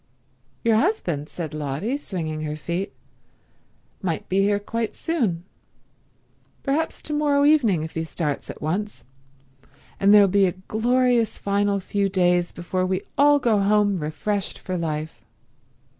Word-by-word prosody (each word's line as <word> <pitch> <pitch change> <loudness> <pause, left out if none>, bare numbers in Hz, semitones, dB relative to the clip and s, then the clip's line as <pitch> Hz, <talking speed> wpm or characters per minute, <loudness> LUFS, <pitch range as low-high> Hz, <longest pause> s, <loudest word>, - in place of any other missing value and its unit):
"Your 225 -1 +4
husband," 180 - 0
said 160 -4 -6
Lotty, 150 - -2
swinging 165 - -4
her 150 -1 -3
feet, 175 +5 -3 1.1
"might 170 -5 -2
be 190 - +1
here 200 +1 +3
quite 225 +2 -3
soon, 230 - -1 1.2
perhaps 305 +3 -1
to 300 - -3
morrow 290 -1 +2
evening 235 - +4
if 160 - -6
he 160 - -2
starts 155 -3 -3
at - - -8
once, 205 +7 -3 0.9
and 200 +1 +5
there'll 205 -1 +8
be 195 0 +3
a 180 - -1
glorious 235 +4 +1
final 200 0 0
few 200 +1 -1
days 180 -2 +2
before 185 +1 -3
we 185 +1 -1
all 290 +1 +5
go 230 -6 +2
home 205 -1 +2
refreshed 190 +6 -2
for 185 - -5
life. 155 -4 -4
195 Hz, 140 wpm, -23 LUFS, 170-225 Hz, 1.2 s, there'll